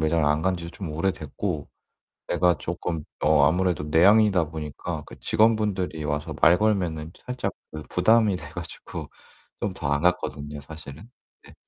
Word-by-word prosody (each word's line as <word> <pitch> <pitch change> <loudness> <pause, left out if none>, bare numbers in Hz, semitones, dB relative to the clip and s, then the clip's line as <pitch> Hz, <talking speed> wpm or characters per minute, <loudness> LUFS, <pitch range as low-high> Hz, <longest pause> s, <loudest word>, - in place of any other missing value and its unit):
매장을 80 0 +2
안 75 +2 +2
간 95 0 +1
지도 85 0 -7
좀 95 -5 -6
오래됐고 80 -1 -2 0.6
내가 85 -1 +3
쪼끔 85 -2 -4 0.2
어 75 -2 +5
아무래도 90 -2 +1
내향인이다 95 +2 +5
보니까 75 -3 -5
그 - - -13
직원분들이 105 -7 +1
와서 75 0 -2
말 85 +2 +7
걸면은 90 -7 0
살짝 125 0 -3 0.2
그 75 -1 -7
부담이 105 +2 +4
돼 75 -2 -10
가지고 85 0 -7 0.5
좀 100 -2 -2
더 80 -6 -4
안 70 +1 +1
갔거든요 75 -4 -1
사실은. 80 - -11 0.3
네. - - -15
85 Hz, 320 characters per minute, -25 LUFS, 75-95 Hz, 0.6 s, 말